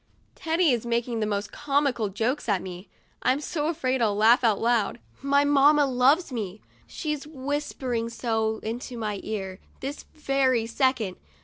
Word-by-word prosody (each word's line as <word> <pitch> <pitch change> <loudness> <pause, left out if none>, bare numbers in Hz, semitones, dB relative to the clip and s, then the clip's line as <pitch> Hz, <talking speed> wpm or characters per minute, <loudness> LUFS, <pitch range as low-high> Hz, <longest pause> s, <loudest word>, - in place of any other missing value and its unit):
Teddy 325 -1 +1
is 235 -3 0
making 235 0 -1
the 215 - 0
most 205 0 -2
comical 280 -6 0
jokes 230 +6 -2
at 195 -3 +1
me; 185 +1 -8 0.3
I'm 260 +2 +2
so 300 0 -2
afraid 265 -6 0
I'll 210 -3 +2
laugh 230 +4 +5
out 220 -4 +3
loud. 235 -2 +1 0.2
My 280 +1 +3
mamma 290 +1 +5
loves 270 +5 +3
me; 210 -5 -4 0.3
she's 300 -3 -4
whispering 265 -5 -3
so 225 -2 -1
into 240 +2 -5
my 210 -3 -3
ear, 190 -3 -5 0.2
this 275 +2 -6
very 270 -5 +1
second. 230 -5 0
245 Hz, 150 wpm, -26 LUFS, 220-280 Hz, 0.3 s, laugh